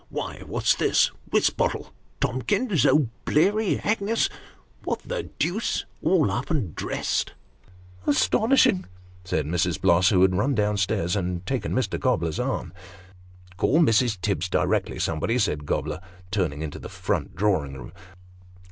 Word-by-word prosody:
" - - -36
Why, - - -5
what's - - +2
this? - - +2 0.2
Wisbottle! - - +1 0.3
Tomkins! 145 - +1
O'Bleary! 155 - +2
Agnes! 215 +1 +1 0.5
What - - -2
the - - -4
deuce! 175 +9 -1 0.2
all 160 - +3
up 120 +6 -3
and 125 - -1
dressed? - - -2 0.3
" 90 -1 -26
" 90 +1 -23
Astonishing! 220 - +3 0.2
" 90 0 -24
said 80 -5 -1
Mrs. 90 +1 0
Bloss, 90 +2 +4
who 95 -3 +4
had 95 -1 +4
run 130 +9 +1
down 105 -1 +1
stairs, 90 -2 0
and 90 -2 -2
taken 135 +1 -2
Mr. 130 - -1
Gobler's 85 -6 0
arm. 125 -4 -2 0.4
" 90 0 -23
Call 145 - +2
Mrs. 115 - +3
Tibbs 90 -3 -1
directly, - - 0
somebody," 80 +9 0
said 75 -11 -1
Gobler, 75 +2 -2 0.3
turning 80 -6 -1
into 75 - -6
the - - -8
front - - -3
drawing 85 -8 0
room. 65 - -9
100 Hz, 145 wpm, -25 LUFS, 90-145 Hz, 0.5 s, Bloss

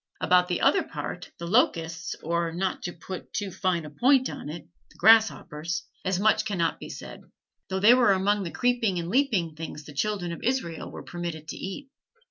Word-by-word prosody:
About 180 0 +4
the 175 -1 -1
other 390 - +4
part, - - -6
the 170 - -6
locusts, 165 -6 +1
or, 170 +1 0
not 185 +3 -2
to 175 - -4
put 180 +2 -8
too 205 -2 -2
fine 175 -2 -1
a 150 - -9
point 260 - +3
on - - -7
it, 165 +1 -8 0.2
the - - -21
grasshoppers, 175 -6 +3 0.2
as 185 -1 0
much 215 +2 +3
cannot 175 -6 -1
be - - -8
said, - - -9 0.5
though 190 0 -1
they 215 +5 +7
were 245 -4 +5
among 200 +2 +1
the 180 - -3
creeping 240 -3 +1
and 170 0 -3
leaping 210 - +1
things 155 -1 -7
the 150 - -10
children 185 +2 -1
of 170 - -7
Israel 240 -11 -2
were - - -9
permitted 170 -3 -6
to - - -4
eat. 270 +9 -7
180 Hz, 195 wpm, -27 LUFS, 165-215 Hz, 0.5 s, they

